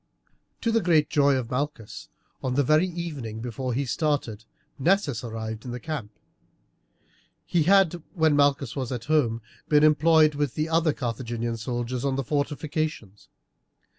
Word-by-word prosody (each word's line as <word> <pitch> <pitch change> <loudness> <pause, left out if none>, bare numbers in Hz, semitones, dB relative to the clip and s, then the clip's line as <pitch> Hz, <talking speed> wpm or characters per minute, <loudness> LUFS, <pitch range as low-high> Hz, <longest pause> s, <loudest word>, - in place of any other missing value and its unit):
To 230 - +1
the 225 0 +2
great 160 -5 +2
joy 140 -1 +4
of 125 -3 -3
Malchus, 130 -5 -4 0.3
on 125 -1 -2
the 145 - +3
very 155 +6 +3
evening 150 -11 -5
before 125 +2 -4
he 135 +4 -1
started 125 -6 -1 0.3
Nessus 155 - +1
arrived 110 -1 -5
in 125 - -7
the 120 +1 -5
camp. 140 -8 -5 1.3
He 170 - +1
had, 190 -4 +4
when 160 -3 +3
Malchus 140 -3 +2
was 130 -3 -3
at 125 +2 -5
Rome, 120 -8 +2 0.3
been 150 -1 +5
employed 155 0 +5
with 145 -3 -2
the 155 +1 -1
other 165 -1 +3
Carthaginian 120 -2 -3
soldiers 120 +2 -3
on 135 -1 0
the 135 - -1
fortifications. 145 - -3
140 Hz, 150 wpm, -26 LUFS, 120-155 Hz, 1.3 s, been